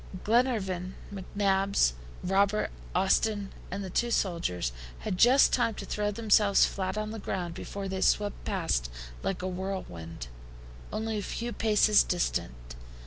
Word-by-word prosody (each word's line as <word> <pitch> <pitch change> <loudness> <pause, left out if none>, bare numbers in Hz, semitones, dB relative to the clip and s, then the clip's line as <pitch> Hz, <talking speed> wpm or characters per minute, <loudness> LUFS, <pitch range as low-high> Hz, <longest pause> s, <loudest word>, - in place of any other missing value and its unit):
Glenarvan, 205 -6 +1 0.2
McNabbs, 195 - +1 0.3
Robert, 200 +3 +2 0.2
Austin, 200 +2 +2 0.2
and 200 +2 -4
the 190 - -5
two 240 +6 +1
sailors, 165 - 0 0.3
had - - -2
just 250 +8 +6
time 230 -3 +2
to - - -6
throw 210 0 -1
themselves 210 -1 +4
flat 190 +1 -3
on 215 0 -2
the 225 - -6
ground 180 -4 -3
before 195 +3 -6
they 190 0 -3
swept 205 +1 +1
past 165 - -1 0.3
like 180 -1 -2
a - - -1
whirlwind, 180 - -5 0.7
only 220 -1 -2
a - - -3
few 235 +4 -4
paces 215 -1 +4
distant. - - -2
195 Hz, 140 wpm, -29 LUFS, 180-215 Hz, 0.7 s, just